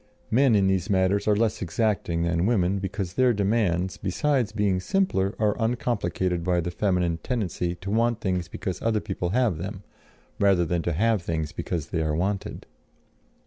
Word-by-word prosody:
Men, 130 0 +4
in 100 -2 +3
these 95 +1 +1
matters, 95 +1 +2
are 105 - +4
less 110 0 0
exacting 90 -2 0
than 85 +2 +1
women, 100 -4 +2
because 95 -1 -4
their 125 +2 +3
demands, 100 -4 0
besides 125 +4 0
being 100 -3 +1
simpler, 100 - 0
are 105 -1 +1
uncomplicated 100 -7 -1
by 90 0 +1
the 85 +1 -2
feminine 90 -4 0
tendency 90 -7 -2
to 95 +3 -6
want 115 +1 +2
things 90 -5 -1
because 90 +2 -5
other 115 -2 +1
people 95 -4 -3
have 110 -5 +1
them, 95 +2 -6 0.6
rather 100 -4 +4
than 85 +1 0
to 85 - -1
have 110 +4 +2
things 80 -2 -3
because 80 -3 -4
they 80 - -1
are 75 -1 0
wanted. 95 +4 -2
95 Hz, 170 wpm, -25 LUFS, 90-110 Hz, 0.6 s, Men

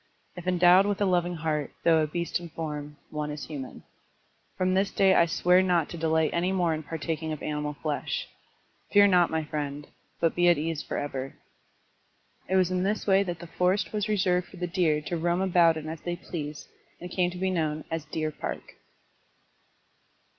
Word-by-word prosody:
If 175 0 -9
endowed 180 +2 +5
with 205 -1 -1
a 205 - +2
loving 175 -1 +1
heart, 155 -2 -2
though 165 -2 +5
a 155 - +1
beast 170 +3 -2
in 170 -1 -9
form, 150 -2 -6
one 150 -1 -3
is 150 -1 -5
human. 135 -4 -8 0.7
From 185 0 +1
this 195 +1 +2
day 195 -1 +4
I 170 -2 +5
swear 180 +2 +4
not 175 -4 +1
to - - -7
delight 160 -1 +1
any 175 +2 +1
more 175 -4 +1
in 155 - -3
partaking 160 0 -4
of 155 - -5
animal 150 -1 -2
flesh. 150 -2 -2 0.6
Fear 205 0 +7
not, 180 -2 +4
my 160 0 -1
friend, 145 -1 -4 0.3
but 165 - +2
be 175 0 +4
at 175 - +5
ease 160 0 -2
forever." 135 -2 -4 1.1
It 190 - +1
was 185 -1 +3
in 180 0 0
this 205 +3 -1
wise 195 0 +3
that 175 -1 -3
the 170 - -9
forest 180 +5 0
was 210 0 -1
reserved 180 -4 +1
for 185 - -14
the 180 - -2
deer 170 -4 +1
to 170 +3 -3
roam 170 +2 0
about 175 -3 +4
in 155 0 -6
as 160 0 -6
they 175 0 -3
pleased 150 -4 -6 0.3
and 180 0 -8
came 180 -1 +1
to 180 - -8
be 190 +1 0
known 155 -3 -1
as 165 -2 -3
Deer 155 0 -3
Park. - - -6
170 Hz, 195 wpm, -27 LUFS, 155-180 Hz, 1.1 s, Fear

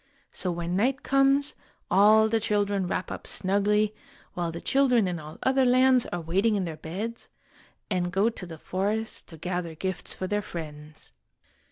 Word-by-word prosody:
So 180 - -1
when 170 +1 -3
night 260 +7 +1
comes, 275 +1 +3 0.4
all 215 +3 +6
the 225 +1 +1
children 205 -3 0
wrap 180 - -3
up - - -7
snugly, 205 +2 +1 0.4
while 175 -1 -2
the 170 - -6
children 250 -5 +3
in 175 -2 -3
all 155 0 -10
other 265 0 +3
lands 255 0 +4
are 175 - -4
waiting 195 +7 +1
in 195 -2 0
their 165 -2 -5
beds, 205 +10 -6 0.6
and 180 -3 -1
go 195 +4 +2
to 185 -5 -9
the 165 -2 -9
forest 205 +7 -3
to 160 - -11
gather 175 0 -4
gifts 185 +1 -2
for 185 - -4
their 205 +2 0
friends. 155 - -9
195 Hz, 170 wpm, -27 LUFS, 175-225 Hz, 0.6 s, all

